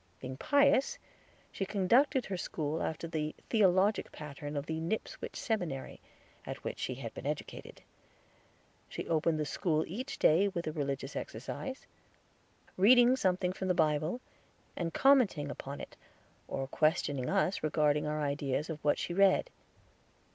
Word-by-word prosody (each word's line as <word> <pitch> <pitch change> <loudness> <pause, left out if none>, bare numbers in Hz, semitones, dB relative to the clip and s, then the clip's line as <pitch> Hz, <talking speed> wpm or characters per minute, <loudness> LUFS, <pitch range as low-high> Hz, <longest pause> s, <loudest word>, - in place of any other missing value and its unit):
Being 130 0 -6
pious, 285 - +3 0.5
she - - -3
conducted 235 +8 +3
her 195 - -3
school 155 -3 -3
after 160 +1 -3
the 155 -2 -3 0.2
theologic 200 -1 +3
pattern 145 0 -7
of 140 - -3
the 160 +1 -3
Nipswich 170 +7 -4
Seminary, 175 - -3 0.4
at - - -7
which - - -4
she 130 - -2
had 120 -3 -7
been 135 - -6
educated. 150 0 -6 1.1
She - - -6
opened 160 -1 +1
the 150 - 0
school 155 +1 0
each 250 +10 -5
day 175 +6 +4
with 175 -3 -3
a 155 - -2
religious 140 -2 -3
exercise, 265 0 -6 0.9
reading 245 +5 +7
something 185 -5 +1
from 190 - -4
the 180 - +2
Bible, 155 +8 +1 0.5
and 170 -2 -2
commenting 210 - +3
upon 140 0 -7
it, - - -9 0.5
or 135 - -3
questioning 145 -3 +1
us 195 -1 +1
regarding 150 -1 +2
our 150 0 -1
ideas 145 +2 -1
of 155 - -7
what 145 - +3
she 175 - -3
read. 195 - +4
165 Hz, 145 wpm, -32 LUFS, 150-200 Hz, 1.1 s, reading